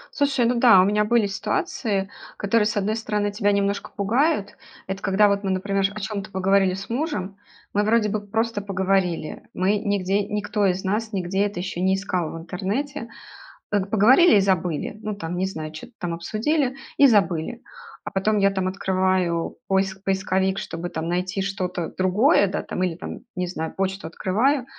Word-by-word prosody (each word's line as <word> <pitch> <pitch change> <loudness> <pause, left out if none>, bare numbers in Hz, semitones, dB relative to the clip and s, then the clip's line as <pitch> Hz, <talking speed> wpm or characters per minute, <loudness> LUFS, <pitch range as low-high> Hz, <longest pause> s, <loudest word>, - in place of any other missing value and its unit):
Слушай, 280 -4 +2
ну 240 0 +1
да, 230 -6 +7
у - - +4
меня 210 +1 +2
были 235 0 +3
ситуации, 200 0 -1 0.3
которые, 210 +1 +2
с 215 0 -2
одной 205 +2 0
стороны, 210 -2 -1
тебя 205 0 +1
немножко 200 0 0
пугают. 210 +1 +1 0.3
Это 195 +1 -5
когда 200 +2 +4
вот 200 0 0
мы, 195 - -1
например, 195 +1 0
о - - -5
чём-то 210 0 -4
поговорили 190 -1 +2
с 195 +1 -7
мужем, 230 - -3 0.4
мы 205 - +2
вроде 215 0 +2
бы 210 0 -2
просто 220 +1 -1
поговорили, 190 -4 -1
мы 195 +3 +2
нигде 200 -1 0
никто 210 0 0
из 185 0 -1
нас 215 +3 -1
нигде 190 +2 0
это 200 -3 -6
еще 180 -1 -4
не 190 +1 +3
искал 185 -4 -2
в - - -7
интернете. 225 - -3 0.6
Пог 200 -1 0
поговорили 245 - +6
и - - +6
забыли. 185 0 -1
Ну 215 -1 -3
там, 175 -3 -5
не 185 - 0
знаю, 160 -5 -5
чё-то 160 +10 -10
там 175 -2 -3
обсудили 250 - -1 0.2
и 285 - +7
забыли. 205 -1 +1 0.4
А - - -5
потом 210 +2 +1
я 195 0 +4
там 190 -1 -1
открываю 185 -3 0
поис 190 0 +1
поисковик, 190 0 0
чтобы 170 +2 -5
там 160 -1 -4
найти 185 +3 -1
что-то 185 -3 -3
другое, 200 - +4
да, 195 - -3
там 180 - -4
или 180 -2 0
там, - - -7 0.2
не 180 0 -1
знаю, 160 -3 -5
почту 190 -2 -2
открываю, 235 - +1
195 Hz, 180 wpm, -23 LUFS, 185-215 Hz, 0.6 s, да